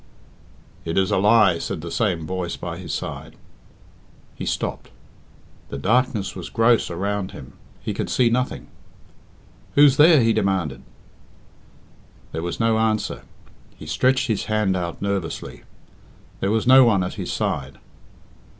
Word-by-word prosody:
"It 80 - -3
is 95 +1 +2
a - - +2
lie," 100 -3 +4
said 80 - -4
the 85 +1 -7
same 90 -8 -1
voice 90 0 -3
by 85 0 -6
his 90 - -7
side. - - -6 1.0
He - - -7
stopped. - - -3 0.8
The 70 - -5
darkness 110 - 0
was 90 - -7
gross 115 +1 +2
around 100 +2 -3
him 65 0 -11 0.3
he - - -3
could - - -4
see 125 - +3
nothing. 125 +2 -1 1.1
"Who's 140 -2 +6
there?" 150 -3 +7
he 115 0 +3
demanded. 95 - -1 1.5
There 80 - -4
was 85 +1 -4
no 115 -1 +2
answer. 110 -1 -1 0.6
He - - -10
stretched 130 0 +1
his 110 -4 -1
hand 105 -3 0
out 85 +1 -4
nervously. 95 -10 -4 0.7
There 95 - -1
was 110 +1 0
no 130 +1 +8
one 105 -6 +3
at 90 - -4
his - - -5
side. - - -3
100 Hz, 140 wpm, -22 LUFS, 85-115 Hz, 1.5 s, no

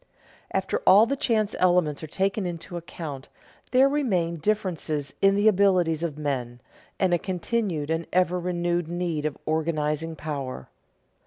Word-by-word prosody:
_ - - -30 0.5
After 190 0 -1
all 200 +4 +8
the 275 +4 -1
chance 220 -6 0
elements 175 -5 +2
are 155 - -6
taken 195 +4 -1
into 175 0 -6
account, 160 -5 -7 0.4
there 260 +2 +5
remain 190 - 0
differences 160 -6 -2
in 195 0 +5
the 205 +2 +3
abilities 185 -6 +3
of 160 -4 -3
men, 130 -5 -3 0.4
and 185 -2 +2
a 175 - +3
continued 180 -4 -2
and 165 +1 -1
ever 180 0 +2
renewed 175 -1 -1
need 170 -3 -2
of 150 - -6
organizing 155 0 -1
power. 140 - -5
175 Hz, 150 wpm, -25 LUFS, 155-190 Hz, 0.5 s, all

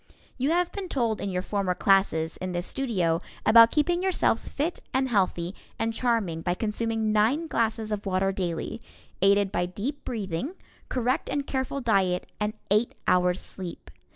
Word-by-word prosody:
You 265 +3 +1
have 350 +1 +2
been 390 -3 -5
told 230 - 0
in 200 - -2
your 180 -1 -2
former 195 -3 -1
classes 170 -5 +2
in 185 0 -4
this 175 0 -2
studio 185 -12 0 0.2
about 230 +1 +8
keeping 345 +6 +1
yourselves 370 -11 +1
fit 315 +5 -2 0.2
and 265 0 +2
healthy 185 -5 +1 0.2
and 225 0 -1
charming 225 -9 0
by 175 +1 0
consuming 220 +1 -1
nine 225 +10 +2
glasses 225 -5 -1
of 210 -1 -3
water 190 +1 +1
daily, 185 +3 -3 0.4
aided 200 0 +4
by 175 - 0
deep 245 +11 -5
breathing, 215 - -3 0.3
correct 255 +4 0
and 285 -1 -1
careful 265 +1 -2
diet 190 -6 +2
and 210 0 -1 0.2
eight 215 +3 +2
hours' 180 0 +3
sleep. 180 -3 -8
215 Hz, 160 wpm, -27 LUFS, 185-255 Hz, 0.4 s, about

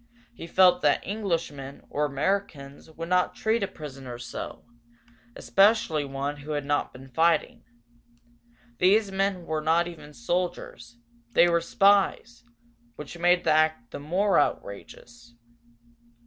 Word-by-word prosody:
He 170 - -9
felt 185 +1 +4
that 145 - +2
Englishmen, 165 -9 -4
or 150 - -1
Americans, 145 -1 -3
would 165 +1 -8
not 180 0 +1
treat 220 +1 0
a 200 - 0
prisoner 135 -7 -9
so 120 -1 -8 0.7
especially 175 - +2
one 140 +1 -4
who 145 +2 -6
had 145 -1 -3
not 145 0 -1
been 130 +1 -13
fighting. 160 +4 +1 1.2
These 200 +2 +3
men 190 -2 -1
were 155 -1 -2
not 165 +3 +2
even 150 -4 -11
soldiers, 120 -4 -4 0.4
they 175 - +6
were 170 -1 +2
spies, 195 - +2 0.5
which 150 +5 -9
made 175 +1 +3
the 160 - +2
act 155 -6 +1
the - - -7
more 185 +7 +1
outrageous. 120 -1 -5
160 Hz, 130 wpm, -26 LUFS, 140-180 Hz, 1.2 s, they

